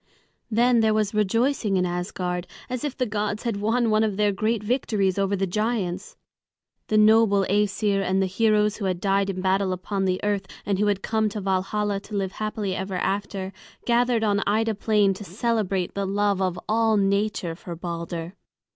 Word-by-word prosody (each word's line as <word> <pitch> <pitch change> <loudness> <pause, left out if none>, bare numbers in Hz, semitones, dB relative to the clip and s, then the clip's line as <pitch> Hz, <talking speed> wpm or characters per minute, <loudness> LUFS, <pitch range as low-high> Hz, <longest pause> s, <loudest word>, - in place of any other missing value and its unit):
Then 240 +2 +3
there 220 -1 +3
was 215 -1 0
rejoicing 215 0 +1
in 180 - +2
Asgard, 180 0 -3 0.2
as 255 -2 -3
if 290 -3 -3
the 255 - +1
gods 210 -1 -2
had 230 -4 -1
won 225 +2 +1
one 215 +1 +3
of 210 -3 -1
their 210 -1 +3
great 215 +2 -1
victories 210 -5 0
over 195 0 +1
the 195 0 0
giants. 200 -1 -2 0.7
The 215 - +2
noble 215 -2 +5
Æsir 205 0 +1
and 190 0 +1
the 190 - +2
heroes 210 +2 +2
who 205 - -4
had 185 -2 -1
died 195 +1 +1
in 185 -1 -3
battle 190 0 +1
upon 190 +2 -2
the 185 -1 0
earth, 205 -2 -1 0.2
and 195 -1 0
who 210 - +2
had 200 -1 0
come 220 -1 +1
to 210 - -5
Valhalla 195 +2 -1
to 205 +1 -9
live 195 -2 -1
happily 215 -3 -3
ever 190 0 -4
after, 195 0 -2 0.3
gathered 240 -1 +2
on 205 -1 +2
Ida 220 +2 +2
Plain 210 -1 +2
to 190 - -9
celebrate 200 -2 -1
the 200 -1 -2
love 200 0 +1
of 185 -1 0
all 220 0 +2
nature 200 -3 0
for 170 +1 -8
Balder. 170 0 -5
200 Hz, 185 wpm, -24 LUFS, 190-215 Hz, 0.7 s, noble